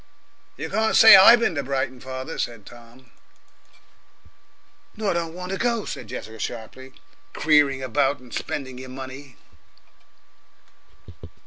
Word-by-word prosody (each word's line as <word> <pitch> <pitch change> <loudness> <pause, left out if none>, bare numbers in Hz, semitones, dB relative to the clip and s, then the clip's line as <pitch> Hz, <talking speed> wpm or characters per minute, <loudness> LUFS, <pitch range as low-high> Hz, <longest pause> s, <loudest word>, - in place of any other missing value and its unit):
"You - - -5
can't 220 0 0
say 225 - +9
I 190 +5 +9
bin 235 -7 -1
to 145 - -2
Brighton, 130 -1 -3
father," 130 +4 -7
said 115 -4 -5
Tom. 120 +1 -17 1.9
"Nor 210 -3 -1
don't 170 -1 -4
want 180 +1 -7
to 195 - -4
go," 235 -2 -1
said 120 - -7
Jessica 110 +1 -9
sharply; 125 +4 -8 0.4
"creering 145 -4 +2
about 135 +2 0
and 125 -2 -16
spendin' 135 -5 -5
your 130 0 -10
money." 130 +1 -10
135 Hz, 125 wpm, -23 LUFS, 130-165 Hz, 1.9 s, say